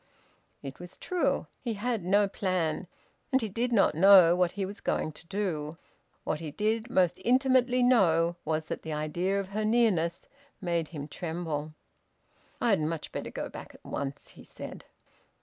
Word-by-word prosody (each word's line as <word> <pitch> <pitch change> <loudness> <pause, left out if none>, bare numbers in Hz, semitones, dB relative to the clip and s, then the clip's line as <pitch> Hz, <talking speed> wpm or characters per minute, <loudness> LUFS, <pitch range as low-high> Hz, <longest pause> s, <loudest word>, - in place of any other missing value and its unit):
It 135 -1 -8
was 175 0 -9
true. 360 -2 0 0.2
He 230 -3 -2
had 225 -1 -2
no 200 +3 +3
plan, 185 -3 -1 0.4
and 265 - +4
he 225 - -2
did 235 +5 -2
not 210 -8 +4
know 180 0 +7
what 180 -1 +1
he 195 -1 -2
was 200 +2 -8
going 155 - -1
to 160 +3 -16
do. 165 -6 -3 0.5
What 150 - -2
he 160 -2 -5
did 220 - -1
most 180 -6 +2
intimately 255 0 +3
know 175 -9 +4
was 155 0 -1
that - - -5
the 160 - -5
idea 175 +6 -1
of 195 -1 -5
her 215 +2 -2
nearness 215 -7 +1 0.3
made 170 -4 -1
him 150 -3 -7
tremble. 160 -2 -4 0.8
"I'd 205 -8 +2
much 155 0 -3
better - - -5
go - - -5
back - - -10
at - - -19
once," 140 0 -5
he - - -14
said. - - -9
185 Hz, 165 wpm, -29 LUFS, 160-215 Hz, 0.8 s, know